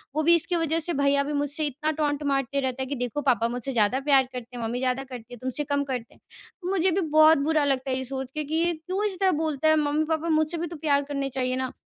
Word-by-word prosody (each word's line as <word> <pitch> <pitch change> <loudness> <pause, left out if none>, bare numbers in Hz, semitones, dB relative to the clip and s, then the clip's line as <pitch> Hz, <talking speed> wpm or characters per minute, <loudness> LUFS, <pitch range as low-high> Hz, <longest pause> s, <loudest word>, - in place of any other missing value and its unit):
वो 310 - +1
भी 340 +2 +6
इसकी 340 +2 -1
वज़ह 330 -1 0
से 340 +2 -3
भैया 280 0 +2
भी 295 - -4
मुझसे 290 +1 -1
इतना 305 +3 -2
टॉन्ट 295 -1 -1
मारते 275 -1 0
रहते 260 0 -2
हैं 260 - -7
कि 285 - -2
देखो 245 +3 -3
पापा 245 -5 +2
मुझसे 245 +2 -4
ज़्यादा 230 +3 +2
प्यार 275 -1 +4
करते 250 0 -7
हैं, 235 - -4
मम्मी 235 +2 -2
ज़्यादा 255 +1 0
करती 245 -3 -10
है, 245 - -8
तुमसे 260 +4 -3
कम 285 0 0
करते 255 -4 -5
हैं। - - -25 0.5
मुझे 380 -1 +2
भी 380 +3 +1
बहुत 310 -1 +5
बुरा 305 +1 +2
लगता 270 -1 0
है 255 - 0
ये 260 - -3
सोच 265 0 -5
के - - +1
ये 340 +1 +2
क्यों 365 +6 -4
इस 385 -3 -3
तरह 380 -1 +3
बोलता 315 -2 0
है 315 - +5
मम्मी-पापा 310 +2 0
मुझसे 315 +2 +1
भी 335 +1 -3
तो 335 - -8
प्यार 285 -2 +2
करने 275 -1 -2
चाहिए 255 -1 -1
ना। 260 0 -2
285 Hz, 265 wpm, -26 LUFS, 260-315 Hz, 0.5 s, भी